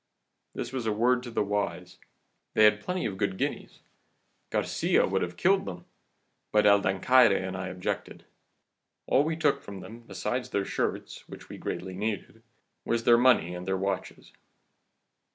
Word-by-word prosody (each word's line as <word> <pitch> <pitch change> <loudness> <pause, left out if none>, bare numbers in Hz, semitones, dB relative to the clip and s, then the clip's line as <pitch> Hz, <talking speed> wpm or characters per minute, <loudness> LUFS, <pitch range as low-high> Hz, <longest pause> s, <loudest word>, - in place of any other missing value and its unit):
This 120 - -5
was 125 -4 -3
a - - +2
word 125 +4 +2
to 125 - -8
the 115 - 0
wise. 100 -3 -3 0.6
They 110 - +5
had 105 0 +5
plenty 180 +8 -3
of 95 -2 -4
good 95 -2 -1
guineas. - - -4 0.7
Garcia - - +1
would - - 0
have 90 0 -4
killed 190 +1 +3
them, 90 -1 -7 0.7
but 105 0 +3
El 100 0 +6
Dancaire 105 +4 +4
and 95 0 -4
I 95 0 -4
objected. 90 0 -5 0.8
All 135 - +3
we 160 +1 -1
took 150 -3 +1
from 100 -2 -9
them, 115 +5 -10
besides 125 +1 -4
their 100 -1 -1
shirts, - - -4
which - - -11
we - - -9
greatly 95 0 -5
needed, 110 +2 -4 0.4
was 115 0 -1
their 120 0 +6
money 120 -9 +4
and 90 +1 -7
their 95 0 0
watches. 95 0 -4
105 Hz, 165 wpm, -28 LUFS, 95-125 Hz, 0.8 s, El